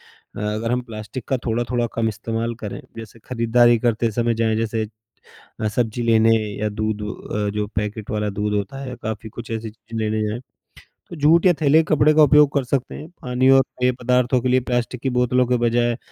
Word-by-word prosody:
अ, - - -13
अगर 110 +2 -2
हम 125 - +1
प्लास्टिक 110 +1 -8
का 135 - +1
थोड़ा-थोड़ा 120 +1 0
कम 115 -1 0
इस्तेमाल 115 +2 -3
करें, 100 - -5 0.2
जैसे 115 0 -10
खरीदारी 120 -1 +3
करते 115 0 +1
समय 120 +1 +1
जाएँ, 110 -1 +1
जैसे 110 -1 -1 0.7
अ, 110 - 0
सब्जी 115 +1 -1
लेने 115 -1 +4 0.2
या 105 - 0
दूध 110 0 -3
अ, 105 0 -4
जो 105 0 -1
पैकेट 105 0 -3
वाला 105 -1 -1
दूध 105 0 0
होता 105 +7 -3
है, 125 -1 -6
काफ़ी 110 0 -4
कुछ 115 +1 -9
ऐसी 110 -1 -4
चीज़ें 115 +1 -9
लेने 110 0 0
जाएँ, 115 +3 -4 0.7
तो 170 - -7
जूट 165 +5 +5
या 180 - +7
थैले 155 +2 +5
कपड़े 155 0 +4
का 155 - +6
उपयोग 150 0 +6
कर 140 - +1
सकते 130 0 -2
हैं। 155 - -8
पानी 125 +1 +1
और 135 0 +7 0.2
पेय 125 0 +3
पदार्थों 125 0 +2
के 130 - -1
लिए 130 +1 +3
प्लास्टिक 120 0 -1
की 135 0 -1
बोतलों 125 0 +2
के 125 0 +2
बजाय 120 0 +2
अ, - - -7
115 Hz, 205 wpm, -21 LUFS, 110-125 Hz, 0.7 s, या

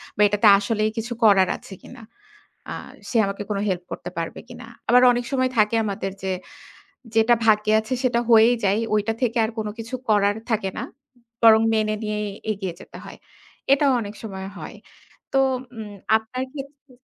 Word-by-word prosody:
বা - - -1
এটাতে 205 +2 +2
আসলেই 215 +1 -1
কিছু 230 +2 -3
করার 195 -4 +5
আছে - - -13
কিনা? 255 -1 -13 0.7
আ - - -4 0.3
সে - - -3
আমাকে 200 +1 -4
কোন 205 - -1
হেল্প 180 -2 -2
করতে - - -6
পারবে 165 - -4
কিনা?" 245 -2 -11 0.2
আবার 245 +1 +6
অনেক 245 0 -2
সময় 255 -1 +1
থাকে 215 +1 +3
আমাদের 195 -2 -3
যে, 190 0 -1 0.8
যেটা 225 +2 +5
ভাগ্যে 215 -1 +3
আছে 220 +4 -4
সেটা 240 -2 +2
হয়েই 230 +1 +6
যায়। 200 +3 +2
ঐটা 210 +1 +1
থেকে 240 -1 +1
আর 220 - -2
কোন 215 - -2
কিছু 225 +3 -7
করার 205 -1 +3
থাকে 210 -4 0
না। - - -3 0.3
উ - - -25 0.2
বরং 220 -1 +7
মেনে 215 -1 +1
নিয়েই 210 -1 -2 0.2
এগিয়ে 190 -4 -5
যেতে - - -12
হয়। - - -11 0.5
এটাও 275 0 +4
অনেক 205 -2 -7
সময় 190 -3 -6
হয়। - - -9 0.6
তো 270 - +3 0.4
উম 210 -2 -7 0.2
আপনার 225 +4 -4
ক্ষেত্রে 280 -1 -10
220 Hz, 175 wpm, -23 LUFS, 205-240 Hz, 0.8 s, বরং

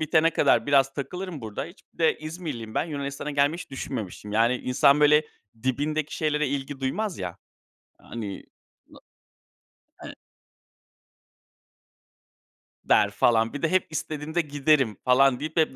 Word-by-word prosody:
bitene 160 +1 +3
kadar - - +3
biraz 135 -1 +3
takılırım 180 +3 -5
burada. 110 -3 -5
Hiç 170 +4 -14
bir - - -31
de 160 -1 +2
İzmirliyim 155 -8 -6
ben. - - +1
Yunanistan'a 140 -2 -5
gelmeyi 145 +3 +1
hiç - - -9
düşünmemiştim. 110 -6 -6
Yani, 115 +3 +3
insan, 140 +4 +3
böyle, 150 +1 +6 0.4
dibindeki 145 +4 -1
şeylere 150 -2 0
ilgi 140 0 -4
duymaz, 190 +9 -2
ya. 90 -2 -5 0.6
Hani, 105 -5 -7 0.4
no - - -16 1.1
e - - -10 2.7
der - - +4
falan. 115 -1 +2
Bir 145 - -5
de 165 - 0
hep 185 -1 +2
istediğimde 155 +1 -2
giderim 145 - +1
falan 125 0 +4
deyip 155 +4 -5
hep 155 -4 +2
145 Hz, 135 wpm, -26 LUFS, 130-155 Hz, 2.7 s, böyle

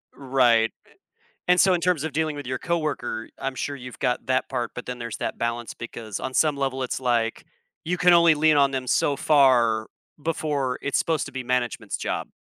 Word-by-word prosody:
Right, 125 -4 +3
a - - -25 0.6
and 180 0 +5
so 190 -2 +5
in 175 - 0
terms 170 -4 +1
of 160 - -3
dealing 155 0 -1
with 145 -3 -7
your 130 0 -2
co-worker, 155 -9 -2
I'm 135 -1 -3
sure 145 +3 -3
you've 125 -1 -10
got 125 -2 -1
that 130 0 +1
part, 120 -3 -2
but 125 - -7
then 125 -1 -5
there's 115 -2 -5
that - - -3
balance 115 0 -3
because 115 -3 -7
on 130 - -4
some 150 +1 +2
level, 135 -1 -2
it's 125 - -3
like 120 -3 0 0.4
you 175 +1 -1
can 180 -1 +5
only 170 -2 +6
lean 155 0 +4
on 140 -1 +4
them 130 -1 -3
so 140 +3 +2
far 125 -7 +3 0.3
before 145 -5 -1
it's 140 - 0
supposed 160 -3 0
to 145 - -9
be 130 -1 -4
management's 125 -2 -2
job. - - -3
135 Hz, 210 wpm, -24 LUFS, 120-155 Hz, 0.6 s, only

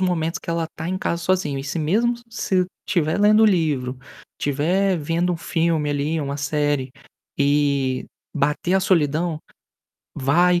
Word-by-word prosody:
momentos 170 -3 0
que - - -7
ela 165 -1 -1
tá 160 +2 -4
em 185 +1 -2
casa 170 -2 -2
sozinho 180 -7 0
e 135 - -5
se 145 +4 -3
mesmo 220 +10 +2 0.2
se 190 -4 0 0.2
estiver 170 -4 +1
lendo 215 +1 +5
o - - +7
livro, 145 -9 +1 0.4
estiver 175 +7 +1
vendo 170 +4 0
um - - -2
filme 165 -2 0
ali, 150 +3 -1
uma 140 0 -3
série 145 -2 -1 0.5
e 140 -2 +1 0.3
bater 160 +5 0
a 190 - +4
solidão, 165 -3 +1 0.8
vai, 175 +6 +3
160 Hz, 155 wpm, -22 LUFS, 145-180 Hz, 0.8 s, o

